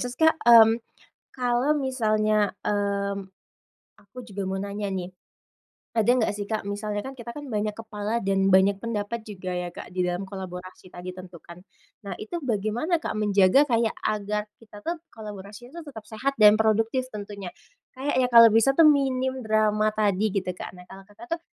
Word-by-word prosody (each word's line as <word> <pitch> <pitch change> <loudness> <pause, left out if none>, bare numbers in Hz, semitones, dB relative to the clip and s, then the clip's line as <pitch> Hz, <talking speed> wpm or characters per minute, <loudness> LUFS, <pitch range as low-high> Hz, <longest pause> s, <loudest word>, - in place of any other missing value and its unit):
terus 245 0 -4
Kak, 320 0 +3
mmm, 230 -1 +7 0.5
kalo 250 +3 +1
misalnya, 215 -6 +1
mmm, 200 -1 -1 0.8
aku 205 +4 -28
juga 200 -1 -4
mau 190 0 -2
nanya 200 +1 -4
nih. 180 -2 -3 0.8
Ada 225 -2 +1
nggak 230 -5 +1
sih 205 -1 -5
Kak, 220 -1 -2
misalnya 205 0 -3
kan, 265 - -6
kita 235 0 -8
kan 290 - -7
banyak 210 0 -1
kepala 220 -1 -4
dan 195 0 +2
banyak 195 +1 +4
pendapat 225 0 -4
juga 185 -3 -6
ya 180 - -3
Kak - - -9
di 185 - -3
dalam 180 +1 -2
kolaborasi 185 -1 -9
tadi 180 +1 -7
tentu 180 -1 -11
kan, 170 0 -12 0.5
nah 195 - -4
itu 215 +11 -5
bagaimana 230 - 0
Kak - - -3
menjaga 205 +6 +4
kayak 230 -2 +2
agar 210 0 -2
kita 215 -2 -14
tuh, 340 +1 -1 0.2
kolaborasinya 215 - -10
tuh 290 - -9
tetap 220 -2 -10
sehat, 240 +6 -2
dan 210 0 +8
produktif 225 +3 +1
tentunya. 200 -3 -7 0.4
Kayaknya 260 -1 0
kalau 230 -1 +10
bisa 225 +4 +4
tuh, 320 +3 +6
minim 260 -2 +1
drama 215 0 +2
tadi 210 0 +1
gitu 195 -2 -2
Kak. - - -7
Nah 180 0 -15
kalau 195 0 -12
Kakak 215 +4 -15
tuh, - - -20
215 Hz, 175 wpm, -25 LUFS, 200-235 Hz, 0.8 s, kalau